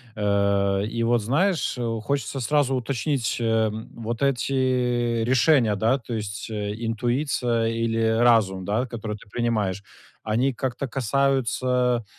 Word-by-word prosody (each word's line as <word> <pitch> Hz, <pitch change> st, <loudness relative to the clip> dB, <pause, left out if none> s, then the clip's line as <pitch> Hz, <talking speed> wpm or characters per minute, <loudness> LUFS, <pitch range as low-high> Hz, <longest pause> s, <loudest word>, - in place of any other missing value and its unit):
Э, 100 Hz, -1 st, +1 dB
и 115 Hz, +2 st, -2 dB
вот 120 Hz, -1 st, +2 dB
знаешь, 155 Hz, -, 0 dB, 0.3 s
хочется 140 Hz, 0 st, -2 dB
сразу 135 Hz, +1 st, +1 dB
уточнить, 130 Hz, -1 st, -1 dB
э, 110 Hz, -1 st, +2 dB, 0.2 s
вот 115 Hz, +2 st, -5 dB
эти 125 Hz, -3 st, +1 dB
решения, 125 Hz, -2 st, +3 dB
да, 115 Hz, +6 st, +2 dB
то 120 Hz, -1 st, -7 dB
есть 105 Hz, -2 st, -5 dB
интуиция 115 Hz, +3 st, -1 dB
или 115 Hz, 0 st, 0 dB
разум, 110 Hz, -6 st, +3 dB
да, 110 Hz, +5 st, 0 dB
которые 110 Hz, -3 st, -5 dB
ты 100 Hz, -, -18 dB
принимаешь, 105 Hz, -5 st, -1 dB, 0.4 s
они 120 Hz, +5 st, +1 dB
как-то 130 Hz, +2 st, -3 dB
касаются, 125 Hz, -1 st, +1 dB
115 Hz, 120 wpm, -24 LUFS, 110-130 Hz, 0.4 s, решения